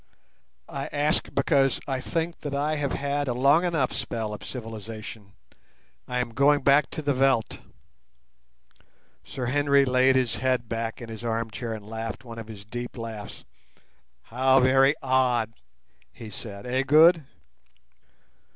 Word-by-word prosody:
"I 135 0 -5
ask 145 +1 +1
because 135 -4 +2
I 135 -2 -2
think 165 +3 -3
that 145 -2 -4
I 150 +2 0
have 145 -2 -2
had 145 0 -1
a 120 - -1
long 140 +7 +4
enough 160 -8 0
spell 110 -2 -3
of 105 - -8
civilization. 110 -3 -8 0.7
I 125 - -3
am 125 -1 -1
going 140 +2 +3
back 140 +1 +4
to 155 - -6
the 145 0 +1
veldt." 130 -4 +1 1.6
Sir 130 - -5
Henry 140 +2 +3
laid 130 +1 +3
his 125 -3 +1
head 130 -2 0
back 115 +1 -4
in 115 - -9
his 110 +1 -8
arm 115 -1 -2
chair 110 +3 -5
and 105 -2 -8
laughed 115 +2 -6
one 115 -1 -8
of 110 - -8
his 105 -2 -10
deep 120 +3 -6
laughs. 110 -3 -8 0.8
"How 130 +3 +3
very 135 +2 +4
odd," 125 -4 +1 0.6
he 110 -2 -10
said, 100 0 -8
"eh, 130 +1 0
Good?" 155 +4 +6
130 Hz, 150 wpm, -26 LUFS, 115-140 Hz, 1.6 s, Good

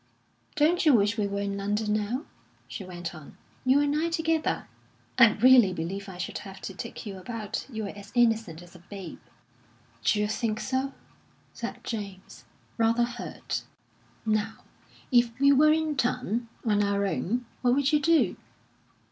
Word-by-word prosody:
"Don't 320 +4 +3
you 300 -5 +6
wish 205 -1 +3
we 210 -3 0
were 200 0 -2
in 200 0 -2
London 210 +2 0
now?" 215 +7 -1 0.4
she 200 - -6
went 175 -3 -6
on. 155 -2 -12 0.3
"You 260 +2 +4
and 290 0 +1
I 325 +2 +1
together? 325 -1 0 0.5
I 230 -3 +8
really 240 -4 +6
believe 195 +4 -4
I 185 - -9
should 180 - -4
have 195 -1 -10
to 195 - -6
take 230 +5 -7
you 195 -3 -6
about. 215 +2 -5
You're 220 -5 -4
as 200 0 -11
innocent 225 -8 +2
as 175 - -16
a - - -12
babe." 190 0 -9 0.8
"D'you 210 0 +2
think 215 0 -1
so?" 265 +1 -1 0.6
said - - -6
James, 200 -4 -7 0.3
rather 230 +1 +3
hurt. 240 0 -4 0.6
"Now, 215 0 -1 0.5
if 240 -1 +3
we 280 +1 +6
were 300 +2 +6
in 315 -1 +1
town, 245 -2 -1 0.2
on 210 -2 +3
our 200 0 +1
own, 235 +5 -1 0.2
what 245 0 +3
would 285 +2 +2
you 300 - +5
do?" 325 +2 +3
220 Hz, 160 wpm, -27 LUFS, 200-260 Hz, 0.8 s, I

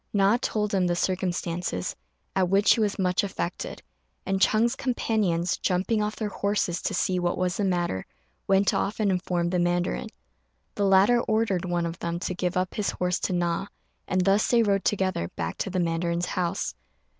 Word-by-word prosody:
Na 200 +1 +4
told 210 -4 -1
him 185 -2 +2
the 175 - +1
circumstances, 175 - -2 0.4
at 185 -2 +2
which 200 +2 +5
he - - -2
was 205 -2 0
much 185 -1 +1
affected; 185 -3 -4 0.4
and 195 0 0
Ch'êng's 230 +5 +3
companions, 210 -10 0
jumping 190 +4 0
off 210 0 -2
their 215 -2 -3
horses 200 -3 -1
to - - -2
see 185 -1 +1
what 175 0 0
was 180 -1 0
the 205 - 0
matter, 175 - -1 0.4
went 195 0 +3
off 205 +3 -1
and 205 -2 +2
informed 175 -2 -1
the 180 - +1
mandarin. 175 0 0 0.6
The 205 - 0
latter 195 +5 +5
ordered 215 -6 0
one 175 -1 0
of 170 0 -5
them 170 0 -2
to 185 - -2
give 180 0 -2
up 185 0 -1
his 210 - -1
horse 180 0 -1
to - - -1
Na, 175 +2 0 0.4
and 185 - +1
thus 200 +2 +3
they 235 -1 +4
rode 200 -2 +1
together 185 - 0
back 80 0 -4
to - - -1
the 185 0 -1
mandarin's 170 0 0
house. 175 -2 -2
185 Hz, 185 wpm, -26 LUFS, 175-200 Hz, 0.6 s, which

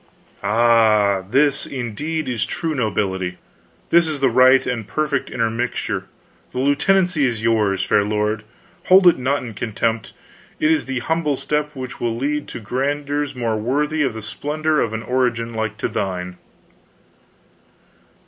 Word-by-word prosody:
"Ah, 105 -2 +3
this, 140 +4 +2
indeed, 140 +5 -4
is 120 -4 -1
true 165 -1 -2
nobility, 95 -7 -1 0.5
this 170 -1 +5
is 155 -2 -3
the 135 -2 +2
right 130 +2 +5
and 115 -4 -3
perfect 150 -3 -1
intermixture. 115 +1 -2 0.5
The - - -6
lieutenancy 150 +3 +2
is 115 -3 -3
yours, 105 -4 +2
fair 100 - +3
lord. 105 +1 -1 0.4
Hold 190 +1 +6
it 175 -6 +6
not 135 +2 0
in 115 -3 -7
contempt; 115 0 -2 0.5
it 155 - +3
is 160 -2 +1
the 130 -2 -3
humble 160 -3 0
step 150 +2 -2
which 130 -1 -7
will 115 -1 -1
lead 145 +3 -2
to - - -7
grandeurs 140 +5 -2
more 115 -3 -1
worthy 150 +7 0
of 130 -6 0
the 110 - -7
splendor 155 +6 -1
of 115 - 0
an 110 0 -4
origin 120 -1 0
like 110 -1 -3
to - - -1
thine." 90 -2 -3
125 Hz, 150 wpm, -20 LUFS, 110-145 Hz, 0.5 s, Hold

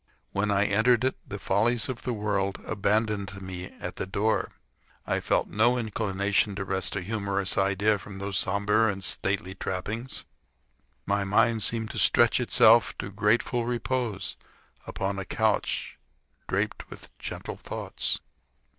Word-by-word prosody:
When 100 +2 0
I 100 0 +3
entered 110 +4 +3
it, 130 - +1
the 100 - -5
follies 110 +4 +1
of 130 -2 -5
the 125 - -2
world 100 -2 -1
abandoned 105 -1 0
me 90 -1 -6
at - - -8
the - - -3
door. 105 +3 0 0.6
I - - 0
felt - - +1
no 120 +4 +3
inclination 100 -2 0
to 95 0 -3
wrest 95 +1 -1
a 100 - -2
humorous 100 -1 -1
idea 100 +2 +2
from 100 -1 -9
those 100 0 -4
sombre 105 +3 +2
and 95 -1 -7
stately 95 -1 -1
trappings. 110 +7 -3 0.8
My 100 0 +1
mind 110 +3 +3
seemed 110 +2 0
to - - -3
stretch 120 +1 +5
itself 115 -1 +5
to 100 - -5
grateful 115 +4 +1
repose 120 -3 -2 0.5
upon 95 0 -2
a - - -3
couch - - -1 0.5
draped - - -2
with - - -12
gentle - - -6
thoughts. - - -1
100 Hz, 145 wpm, -27 LUFS, 95-110 Hz, 0.8 s, stretch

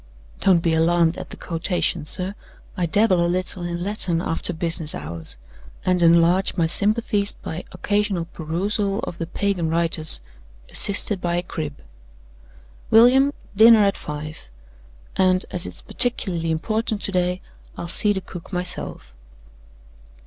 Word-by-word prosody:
Don't 180 -4 +3
be 165 - +1
alarmed 165 +1 +2
at - - -9
the - - -10
quotation, 170 -2 -1
sir. 185 +4 -1 0.4
I 180 -3 -1
dabble 190 -1 +2
a 170 - 0
little 185 +1 -3
in 175 0 -4
Latin 195 -4 -1
after 165 -1 0
business 165 -1 -3
hours, 80 -1 -7 0.5
and 180 -1 +1
enlarge 170 +3 +3
my 170 - +2
sympathies 205 +3 +1
by 160 +2 -8
occasional 205 -1 -1
perusal 195 +6 -2
of 170 - -7
the 165 - -4
Pagan 180 -2 -2
writers, 165 -1 +2 0.5
assisted 200 -1 +3
by 175 0 -1
a 175 - -1
crib. 155 -5 -6 1.1
William, 255 +5 +5 0.2
dinner 220 +1 +7
at 200 -1 +1
five; 150 - -8 0.7
and, 185 0 +2
as 180 -1 0
it's - - -8
particularly 185 -9 0
important 215 +7 -2
to - - -1
day, 180 0 -1 0.4
I'll 170 - -6
see 205 +4 +6
the 190 -2 -2
cook 175 -1 -11
myself." 180 - 0
180 Hz, 140 wpm, -22 LUFS, 165-200 Hz, 1.1 s, dinner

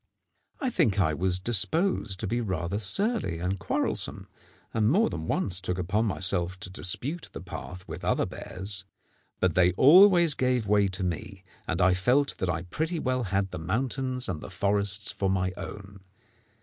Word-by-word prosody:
I 260 -3 -1
think 120 - +2
I 80 -5 +2
was 90 +3 0
disposed 110 - +2
to 110 - -2
be 120 +5 -1
rather 95 -2 -2
surly 110 - 0
and 90 +3 -2
quarrelsome, - - -2 0.5
and 110 -1 +2
more 210 - +3
than 80 0 -5
once 95 -1 0
took 90 -1 -3
upon 100 +5 0
myself 95 -3 +2
to 90 - -6
dispute 130 - -2
the - - -6
path 90 +2 -9
with - - -8
other - - +1
bears; 95 +1 -5 0.6
but 95 -2 +2
they 90 +1 +4
always 170 - +7
gave 125 -4 0
way 100 0 +3
to 95 0 -5
me, 95 +2 -4 0.2
and - - -2
I 90 +1 +4
felt 125 +10 +1
that 95 - -1
I 85 -1 -2
pretty 160 - -3
well 130 -4 -1
had 95 0 -1
the - - -5
mountains 125 - -2
and 85 -5 -4
the - - -8
forests 100 +1 0
for 95 - -1
my 95 -1 0
own. 100 0 -9
100 Hz, 175 wpm, -27 LUFS, 90-125 Hz, 0.6 s, always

